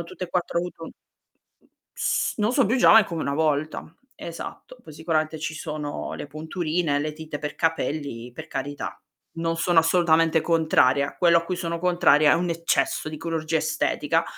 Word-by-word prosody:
hanno - - -5
tutte 185 - -7
e - - -10
4, 175 -1 -1
avuto 170 -2 -6 1.1
S - - 0
non 215 +3 +1
so 265 -4 +3
più 235 - +1
giovani 225 -3 +7
come 165 -4 -4
una 140 - -1
volta. 155 0 0 0.3
Esatto, 170 +8 -9
poi 155 - -12
sicuramente 155 0 -1
ci 155 0 -4
sono 150 -2 -5
le - - -6
punturine, 160 +1 -2
le 150 +1 -2
tinte 155 -1 -7
per 150 0 -5
capelli, 145 -7 -2
per 160 +5 -9
carità. 145 +1 -5 0.4
Non 165 0 -1
sono 175 0 +2
assolutamente 165 -1 +3
contraria, 155 -5 +2
quello 170 -1 +5
a - - -4
cui 180 - -3
sono 170 -1 -3
contraria 175 -4 +4
è - - +6
un 175 0 -1
eccesso 165 -1 0
di 155 - -6
chirurgia 165 0 -2
estetica. 155 -1 0
160 Hz, 170 wpm, -24 LUFS, 155-170 Hz, 1.1 s, giovani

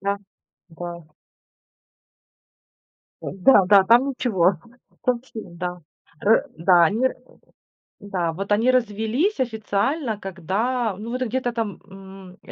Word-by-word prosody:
Да, 200 +1 -1 0.5
да. 170 +1 -7 2.2
Ой, - - -5
да, 195 0 +6
да. 195 0 +6
Там 240 +6 +5
ничего, 205 -9 +1 0.5
точно 245 -3 -2
да, 180 +1 -4 0.5
э, 220 +3 +5
да, 170 +1 +5
они 225 +10 +2
ра - - -9 0.9
да, 180 -5 -2
вот 195 +4 -6
они 225 +5 +3
развелись 240 - 0
официально, 225 +1 -1
когда, 205 +5 -2
ну 225 +2 -7
вот 255 +1 -3
где-то 245 +1 -2
там, 225 -4 -3
м, 190 -1 -13
205 Hz, 115 wpm, -23 LUFS, 190-245 Hz, 2.2 s, да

